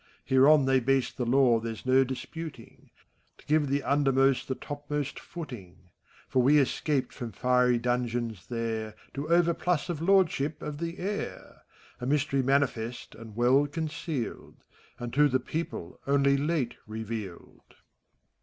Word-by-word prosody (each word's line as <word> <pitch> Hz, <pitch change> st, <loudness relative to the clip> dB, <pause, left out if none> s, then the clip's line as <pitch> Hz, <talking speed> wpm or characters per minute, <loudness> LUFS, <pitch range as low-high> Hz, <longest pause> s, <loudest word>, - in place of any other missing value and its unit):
Hereon 135 Hz, +2 st, +5 dB
they 135 Hz, 0 st, +4 dB
base 135 Hz, +1 st, +1 dB
the 125 Hz, -, -4 dB
law 125 Hz, -2 st, +4 dB
there's 115 Hz, +1 st, -6 dB
no 130 Hz, +1 st, +5 dB
disputing, 155 Hz, +5 st, -8 dB, 0.5 s
To -, -, -20 dB
give 150 Hz, -1 st, +2 dB
the 140 Hz, +1 st, 0 dB
undermost 135 Hz, -2 st, +2 dB
the 130 Hz, -, -2 dB
topmost 145 Hz, 0 st, -4 dB
footing: 105 Hz, -, -10 dB, 0.4 s
For 130 Hz, -, +2 dB
we 140 Hz, +4 st, +5 dB
escaped 140 Hz, 0 st, 0 dB
from 120 Hz, -2 st, -6 dB
fiery 125 Hz, -1 st, +3 dB
dungeons 120 Hz, -3 st, -2 dB
there 110 Hz, -2 st, -3 dB, 0.2 s
To 145 Hz, +3 st, -5 dB
overplus 170 Hz, -1 st, +2 dB
of 165 Hz, -3 st, -3 dB
lordship 165 Hz, -5 st, +2 dB
of 150 Hz, -1 st, -5 dB
the 170 Hz, +1 st, -4 dB
air; 205 Hz, +3 st, -5 dB, 0.2 s
— -, -, -26 dB
A 125 Hz, -, -3 dB
mystery 140 Hz, -1 st, +1 dB
manifest 125 Hz, -3 st, 0 dB
and 110 Hz, -2 st, -11 dB
well 130 Hz, +5 st, +4 dB
concealed. 155 Hz, -3 st, -4 dB, 0.4 s
And 120 Hz, 0 st, -6 dB
to 150 Hz, +3 st, +5 dB
the 130 Hz, 0 st, +2 dB
people 130 Hz, -, -5 dB
only 140 Hz, 0 st, +4 dB
late 140 Hz, -3 st, -1 dB
revealed. 110 Hz, -4 st, -7 dB
135 Hz, 140 wpm, -28 LUFS, 120-150 Hz, 0.5 s, Hereon